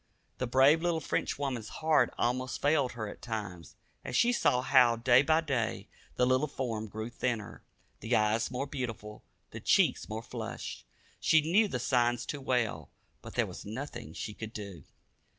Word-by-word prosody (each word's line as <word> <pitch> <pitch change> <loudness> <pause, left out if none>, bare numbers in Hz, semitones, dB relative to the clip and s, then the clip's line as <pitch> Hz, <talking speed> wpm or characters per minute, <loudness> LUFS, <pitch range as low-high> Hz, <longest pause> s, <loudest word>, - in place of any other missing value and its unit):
The 125 - -1
brave 135 +6 +5
little 170 -1 +1
Frenchwoman's 135 -6 -2
heart 155 -6 +2
almost 125 +1 -1
failed 145 -3 +2
her 110 -3 -4
at - - -9
times, 105 -7 -6 0.3
as - - -5
she 240 - +4
saw 125 - +2
how 125 -3 +5
day 120 +2 +5
by 155 +3 +3
day 130 -8 -2 0.3
the 125 - +3
little 130 +4 +2
form 115 -6 -4
grew 110 +3 -6
thinner, 115 -4 -3 0.4
the 115 +3 0
eyes 110 +1 +2
more 130 +2 -3
beautiful, 115 -6 -6 0.3
the - - -7
cheeks - - +2
more 110 +1 -4
flushed. - - -6 0.3
She 160 -1 +4
knew 185 +8 +3
the 130 - -3
signs 120 -1 +1
too 145 - -5
well, 115 - -1 0.3
but - - -10
there - - +2
was - - -9
nothing 120 +2 -7
she 105 - -5
could 110 +1 -8
do. 100 -7 -8
125 Hz, 170 wpm, -30 LUFS, 110-140 Hz, 0.4 s, brave